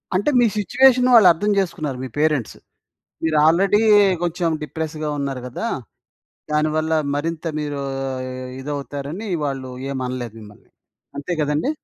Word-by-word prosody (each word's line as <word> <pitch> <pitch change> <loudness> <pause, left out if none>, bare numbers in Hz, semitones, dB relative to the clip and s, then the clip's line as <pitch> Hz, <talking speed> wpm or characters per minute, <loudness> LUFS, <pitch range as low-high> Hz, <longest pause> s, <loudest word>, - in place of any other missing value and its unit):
అంటే 200 +9 +2
మీ 240 - +5
సిట్యుయేషను 255 +4 +4
వాళ్ళు 215 -5 +8
అర్థం 205 +6 0
జేసుకున్నారు 155 -8 -1
మీ - - -4
పేరెంట్స్. 150 -6 +1 0.7
మీరు 160 -1 +1
ఆల్రెడీ 190 +6 +4 0.4
కొంచెం 170 0 0
డిప్రెస్‌గా 155 0 -4
ఉన్నారు 135 -2 -3
గదా! 175 - -4 0.9
దానివల్ల 155 +1 +1 0.2
మరింత 160 +3 -3 0.2
మీరు, 145 -1 -3 0.8
ఇదవుతారని 145 +7 -5 0.2
వాళ్ళు 135 -2 -4 0.2
ఏమనలేదు 125 -4 -4
మిమ్మల్ని. 105 -1 -15 0.5
అంతే 145 +5 -4
గదండీ! 150 - 0
155 Hz, 115 wpm, -21 LUFS, 140-175 Hz, 0.9 s, వాళ్ళు